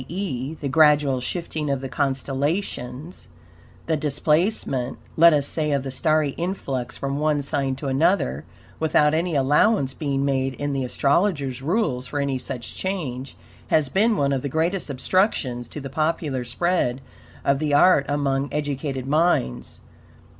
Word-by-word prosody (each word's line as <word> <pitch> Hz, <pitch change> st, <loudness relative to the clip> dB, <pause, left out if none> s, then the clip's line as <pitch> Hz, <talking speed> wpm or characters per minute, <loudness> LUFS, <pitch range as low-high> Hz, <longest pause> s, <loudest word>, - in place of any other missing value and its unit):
e., 160 Hz, -6 st, -4 dB
the 145 Hz, -, -3 dB
gradual 145 Hz, -3 st, +4 dB
shifting 155 Hz, +1 st, -3 dB
of 140 Hz, -1 st, 0 dB
the 135 Hz, -, -5 dB
constellations, 140 Hz, +2 st, -3 dB, 0.6 s
the 160 Hz, -, +1 dB
DISPLACEMENT, 150 Hz, -, 0 dB, 0.2 s
let 170 Hz, +1 st, +7 dB
us 145 Hz, -3 st, +2 dB
say, 150 Hz, +1 st, -1 dB
of 140 Hz, -2 st, 0 dB
the 135 Hz, -, -5 dB
starry 155 Hz, +1 st, +1 dB
influx 135 Hz, -9 st, -3 dB
from 140 Hz, +1 st, -3 dB
one 150 Hz, -1 st, +1 dB
sign 135 Hz, -1 st, -1 dB
to 135 Hz, -, -8 dB
another 135 Hz, -, +1 dB, 0.4 s
without 150 Hz, -1 st, +3 dB
any 165 Hz, +1 st, 0 dB
ALLOWANCE 140 Hz, +2 st, +3 dB
being 140 Hz, -2 st, -1 dB
made 135 Hz, -1 st, 0 dB
in 145 Hz, +3 st, -3 dB
the 135 Hz, -1 st, -1 dB
astrologer's 140 Hz, 0 st, 0 dB
rules 150 Hz, -, 0 dB
for 145 Hz, -, -3 dB
any 140 Hz, -2 st, -1 dB
such 125 Hz, -2 st, -6 dB
change, 140 Hz, -9 st, -4 dB, 0.3 s
has 155 Hz, -4 st, +2 dB
been 215 Hz, -, +2 dB
one 140 Hz, 0 st, +1 dB
of 135 Hz, -, -1 dB
the 140 Hz, -, -3 dB
greatest 165 Hz, +4 st, -1 dB
obstructions 130 Hz, -, 0 dB
to -, -, -7 dB
the 135 Hz, -, -6 dB
popular 150 Hz, -2 st, -1 dB
spread 130 Hz, 0 st, 0 dB, 0.5 s
of 140 Hz, 0 st, +2 dB
the 150 Hz, -1 st, -1 dB
art 145 Hz, -1 st, +5 dB
among 140 Hz, -1 st, 0 dB
EDUCATED 140 Hz, -3 st, -3 dB
MINDS. 150 Hz, -, 0 dB
145 Hz, 150 wpm, -23 LUFS, 135-160 Hz, 0.6 s, let